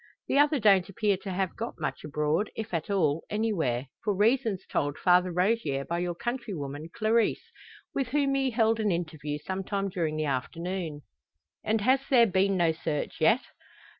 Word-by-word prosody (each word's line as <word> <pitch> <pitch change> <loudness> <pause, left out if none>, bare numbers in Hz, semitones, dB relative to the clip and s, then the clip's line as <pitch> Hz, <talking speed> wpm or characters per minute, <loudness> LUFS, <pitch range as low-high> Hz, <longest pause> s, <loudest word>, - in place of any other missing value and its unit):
The 280 - +2
other 295 +1 +4
don't 195 -4 +4
appear 210 -1 +1
to 195 +1 -8
have 185 0 -1
got 230 +1 -5
much - - -3
abroad, 150 +6 0
if 220 -3 -6
at 165 +1 -2
all, 165 -6 +1
anywhere 170 - 0 0.2
for 205 -2 0
reasons 220 -1 +1
told 145 0 -1
Father 180 0 +4
Rogier 180 -7 0
by 170 +1 -2
your 175 -1 -2
countrywoman, 170 - -4
Clarisse, 225 +1 +1 0.4
with 270 -3 -1
whom 280 +2 +1
he 270 -1 +1
held 225 -1 +2
an 210 -2 +1
interview 155 -4 -3
sometime 195 +1 -2
during 165 -5 -2
the 155 - 0
afternoon." 160 +3 -3 0.6
"And 220 0 +1
has 260 +5 +4
there 245 -3 +6
been 195 -1 +2
no 170 -2 +3
search 155 -2 -3
yet?" 220 - +5
190 Hz, 165 wpm, -28 LUFS, 160-225 Hz, 0.6 s, there